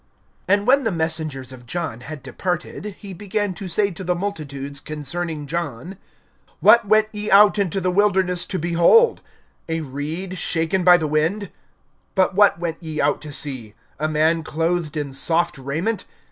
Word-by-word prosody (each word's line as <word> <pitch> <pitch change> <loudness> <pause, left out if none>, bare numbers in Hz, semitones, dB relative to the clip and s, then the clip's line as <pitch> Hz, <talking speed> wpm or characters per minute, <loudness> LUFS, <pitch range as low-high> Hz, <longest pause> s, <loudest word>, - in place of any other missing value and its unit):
(24)And 200 +1 +3
when 270 +3 +4
the 225 - +1
messengers 160 -6 -2
of 120 -1 -13
John 160 -7 -4
had 145 +2 -9
departed, 185 +3 -4
he 200 -3 -9
began 205 +1 -2
to 195 +1 -7
say 200 +4 +1
to 180 +2 -7
the 180 0 0
multitudes 145 -7 -5
concerning 155 +1 -5
John: 165 +2 -4 0.6
What 235 -3 +6
went 215 +1 +4
ye 210 0 -4
out 205 +1 +6
into 195 -1 0
the 185 -1 0
wilderness 185 -2 +2
to 190 - -3
behold? 175 - +4 0.5
A 165 0 -1
reed 160 +6 -5
shaken 165 +3 0
by 180 0 +8
the 160 - -2
wind? 165 +7 0 0.7
(25)But 190 +1 +3
what 205 -1 +5
went 170 -1 -4
ye 155 -2 -5
out 145 0 +1
to 150 - -8
see? 130 -7 -3 0.2
A 155 - 0
man 155 +2 +2
clothed 165 0 -1
in 145 -2 -3
soft 165 +2 0
raiment? 160 +12 -2
170 Hz, 165 wpm, -22 LUFS, 150-195 Hz, 0.7 s, by